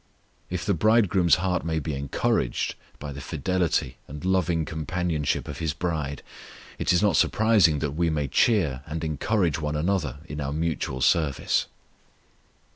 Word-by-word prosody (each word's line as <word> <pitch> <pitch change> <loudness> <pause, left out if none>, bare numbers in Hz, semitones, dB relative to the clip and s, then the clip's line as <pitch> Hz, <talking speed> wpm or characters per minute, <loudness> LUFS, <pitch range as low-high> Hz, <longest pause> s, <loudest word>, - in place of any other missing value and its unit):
If 85 -2 -3
the 100 - +2
Bridegroom's 95 -3 +4
heart 90 0 -1
may 80 -1 -1
be 75 0 -3
encouraged 70 -2 -1 0.2
by 70 0 -6
the 70 - -8
fidelity 85 -5 -1
and 75 +4 -8
loving 90 -3 +1
companionship 80 -1 -2
of - - -6
his 80 -3 -1
bride, 80 -4 -3 0.6
it - - +1
is 90 +3 +3
not 100 -6 +3
surprising 105 -8 +4
that 75 - -2
we 85 +3 0
may 75 -3 -1
cheer 75 - +2
and 80 +1 -4
encourage 80 +2 0
one 75 -1 -2
another 75 -4 0
in 75 -2 -6
our 70 0 -2
mutual 80 -4 -2
service. 75 -1 +2
80 Hz, 150 wpm, -26 LUFS, 75-90 Hz, 0.6 s, Bridegroom's